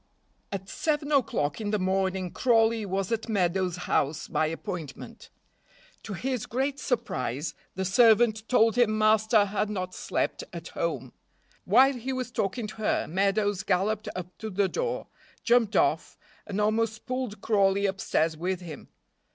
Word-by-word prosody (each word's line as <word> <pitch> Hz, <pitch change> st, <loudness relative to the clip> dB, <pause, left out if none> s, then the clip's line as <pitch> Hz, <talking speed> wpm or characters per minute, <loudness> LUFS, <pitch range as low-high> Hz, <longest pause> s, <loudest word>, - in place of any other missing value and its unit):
AT 195 Hz, -1 st, -5 dB
seven 295 Hz, +2 st, -1 dB
o'clock 220 Hz, -, +1 dB
in 210 Hz, -, -2 dB
the 210 Hz, -, +1 dB
morning 190 Hz, -1 st, 0 dB
Crawley 225 Hz, -3 st, +2 dB
was 195 Hz, +2 st, -2 dB
at 230 Hz, 0 st, -2 dB
Meadows' 185 Hz, -3 st, +1 dB
house 145 Hz, +2 st, 0 dB
by 155 Hz, -, +1 dB
appointment. 160 Hz, -2 st, -7 dB, 0.7 s
To 210 Hz, -, -7 dB
his 250 Hz, +4 st, -3 dB
great 270 Hz, +3 st, -1 dB
surprise 150 Hz, -, -2 dB, 0.2 s
the 190 Hz, +1 st, -2 dB
servant 220 Hz, +1 st, +4 dB
told 230 Hz, -2 st, +4 dB
him 215 Hz, -3 st, +3 dB
master 215 Hz, 0 st, +4 dB
had 205 Hz, +1 st, -1 dB
not 185 Hz, -3 st, -4 dB
slept -, -, -2 dB
at -, -, -8 dB
home. -, -, -3 dB, 0.5 s
While 270 Hz, +1 st, +6 dB
he 255 Hz, +1 st, -4 dB
was 255 Hz, -2 st, -4 dB
talking 215 Hz, +1 st, -2 dB
to 210 Hz, -, -8 dB
her 220 Hz, -, 0 dB
Meadows 200 Hz, +2 st, +1 dB
galloped 205 Hz, +3 st, 0 dB
up 180 Hz, 0 st, -6 dB
to 220 Hz, -, -5 dB
the 200 Hz, 0 st, +1 dB
door, -, -, -2 dB, 0.4 s
jumped 235 Hz, -3 st, +3 dB
off, -, -, +1 dB, 0.3 s
and 205 Hz, -1 st, -3 dB
almost 220 Hz, +1 st, 0 dB
pulled 255 Hz, -4 st, -3 dB
Crawley 200 Hz, -2 st, +2 dB
upstairs 165 Hz, -4 st, 0 dB
with 180 Hz, +3 st, -2 dB
him. 165 Hz, -4 st, -9 dB
210 Hz, 150 wpm, -27 LUFS, 190-230 Hz, 0.7 s, While